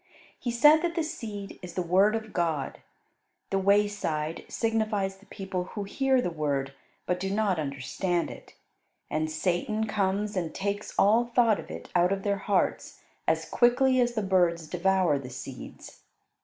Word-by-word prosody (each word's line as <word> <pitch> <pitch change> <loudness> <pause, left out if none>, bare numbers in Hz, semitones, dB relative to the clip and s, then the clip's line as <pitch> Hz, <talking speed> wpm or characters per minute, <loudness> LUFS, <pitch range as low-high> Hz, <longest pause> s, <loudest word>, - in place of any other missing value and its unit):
He 245 - -3
said 295 +7 +6
that 340 -1 -1
the 330 - +1
seed 210 -9 -6
is 175 -2 -9
the 180 - 0
Word 190 +5 +4
of 220 -1 -5
God. 160 -6 -1 0.7
The 195 - +2
wayside 195 -6 +1
signifies 215 -4 -1
the 200 - -21
people 190 -2 -4
who 205 +2 -5
hear 265 +6 +1
the 180 - -1
Word 140 -4 -2 0.3
but 180 0 -1
do 190 +1 -2
not 200 -3 +1
understand 155 +5 -2
it, - - -13 0.6
and 155 +1 0
Satan 180 +7 -1
comes 205 0 -1
and 170 -4 -2
takes 200 +1 -3
all 220 +4 +5
thought 235 -3 +3
of - - -9
it - - -8
out 180 +1 +3
of 195 0 -1
their 200 -1 0
hearts 195 -1 -1 0.3
as - - +1
quickly 255 +2 +3
as 240 0 +1
the 215 - 0
birds 175 -4 +2
devour 180 -3 +2
the 130 -2 -8
seeds. 130 0 -9
195 Hz, 165 wpm, -28 LUFS, 170-215 Hz, 0.7 s, said